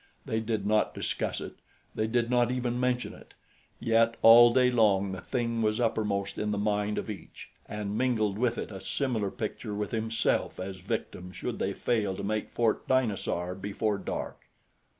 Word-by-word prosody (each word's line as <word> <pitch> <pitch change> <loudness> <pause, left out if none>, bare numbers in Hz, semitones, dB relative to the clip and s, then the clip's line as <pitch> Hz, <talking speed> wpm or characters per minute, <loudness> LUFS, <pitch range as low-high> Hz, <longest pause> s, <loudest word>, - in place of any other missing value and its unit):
They 110 - -1
did 110 -2 -2
not 105 +1 +2
discuss - - -2
it - - -8 0.4
they 110 - -1
did 120 +1 +1
not 120 -1 +2
even 125 -1 -1
mention 125 -1 0
it - - -16 0.4
yet 115 -1 +3
all 120 +1 +9
day 125 +1 +4
long 100 -5 +3
the 95 - -6
thing 115 -2 -1
was 110 0 +1
uppermost 105 -4 -1
in 105 - -1
the 105 - -1
mind 105 0 0
of - - -3
each 105 -3 -9 0.2
and 105 -1 -4
mingled 110 -5 +1
with 120 -1 +1
it - - -4
a 95 -2 -7
similar 120 -8 -1
picture 110 -1 -5
with 105 0 -3
himself 115 0 0
as 95 0 -5
victim 90 0 -4
should - - -5
they - - -1
fail 105 -5 0
to - - -6
make 110 +1 -2
Fort 115 -2 0
Dinosaur 100 -8 0
before 100 +2 -2
dark. - - -5
110 Hz, 175 wpm, -29 LUFS, 100-120 Hz, 0.4 s, all